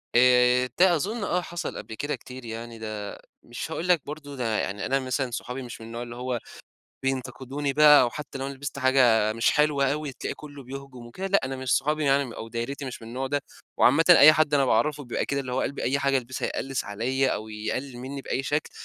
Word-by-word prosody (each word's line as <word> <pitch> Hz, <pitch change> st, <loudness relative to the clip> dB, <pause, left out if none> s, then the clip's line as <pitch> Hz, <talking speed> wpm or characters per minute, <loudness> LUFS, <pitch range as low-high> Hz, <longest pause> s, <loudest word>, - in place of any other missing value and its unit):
آآ، 125 Hz, 0 st, +5 dB
ده 180 Hz, -1 st, +6 dB
أظُن 205 Hz, +8 st, -2 dB
آه، 180 Hz, -2 st, 0 dB
حصل 175 Hz, -1 st, -5 dB
قبل 110 Hz, -, -8 dB
كده 145 Hz, +5 st, -2 dB
كتير 125 Hz, -1 st, -11 dB
يعني 115 Hz, 0 st, -7 dB
ده 105 Hz, -2 st, -6 dB, 0.3 s
مش 120 Hz, +6 st, -6 dB
هاقول 165 Hz, +2 st, -3 dB
لك 175 Hz, -4 st, +4 dB
برضه 145 Hz, -1 st, -8 dB
ده 115 Hz, -4 st, -1 dB
يعني 100 Hz, +1 st, -3 dB
أنا 135 Hz, +1 st, +1 dB
مثلًا 130 Hz, -1 st, -2 dB
صحابي 125 Hz, +2 st, -5 dB
مش 120 Hz, -1 st, -8 dB
من 110 Hz, -, -9 dB
النوع 115 Hz, +1 st, -5 dB
اللي 120 Hz, -1 st, -8 dB
هو 125 Hz, 0 st, -3 dB, 0.6 s
بينتقدوني 135 Hz, +1 st, -2 dB
بقى، 150 Hz, +1 st, +8 dB
أو 120 Hz, -2 st, +2 dB
حتّى 145 Hz, -1 st, -7 dB
لو 135 Hz, -, -3 dB
أنا 140 Hz, -, -5 dB
لبست 140 Hz, +1 st, -6 dB
حاجة 125 Hz, -5 st, +4 dB
مش 115 Hz, +1 st, +2 dB
حلوة 145 Hz, -2 st, +2 dB
أوي، 150 Hz, -2 st, -3 dB
تلاقي -, -, -5 dB
كُلّه 145 Hz, -2 st, -11 dB
بيهجم 130 Hz, -2 st, -9 dB
وكده، 185 Hz, +11 st, -6 dB
لأ 200 Hz, +1 st, +3 dB
أنا 130 Hz, 0 st, -4 dB
مش 130 Hz, -1 st, +1 dB
صحابي 150 Hz, +2 st, 0 dB
يعني، 135 Hz, -3 st, +1 dB
أو 115 Hz, -, -7 dB
دايرتي 120 Hz, +5 st, -4 dB
مش 130 Hz, -3 st, -7 dB
من 115 Hz, -, -9 dB
النوع 130 Hz, +3 st, -3 dB
ده. 145 Hz, +2 st, 0 dB, 0.4 s
وعامةً 165 Hz, -, +5 dB
أي 155 Hz, -3 st, +10 dB
حد 155 Hz, -1 st, +2 dB
أنا 140 Hz, -, +4 dB
باعرفه 150 Hz, +2 st, +1 dB
بيبقى 120 Hz, -, -2 dB
كده، 140 Hz, 0 st, -1 dB
اللي 130 Hz, -2 st, -5 dB
هو 130 Hz, -, 0 dB
قلب 140 Hz, -, -3 dB
أي 140 Hz, +2 st, +1 dB
حاجة 140 Hz, -1 st, +2 dB
ألبسها 130 Hz, +1 st, -4 dB
يقلِّس 135 Hz, -1 st, -3 dB
عليّا، 130 Hz, +6 st, 0 dB
أو 110 Hz, +1 st, -3 dB
يقلل 120 Hz, +4 st, -4 dB
مِنّي 135 Hz, +2 st, -6 dB
بأي 135 Hz, -, -2 dB
شكل. 145 Hz, +3 st, -1 dB
135 Hz, 225 wpm, -26 LUFS, 120-145 Hz, 0.6 s, أي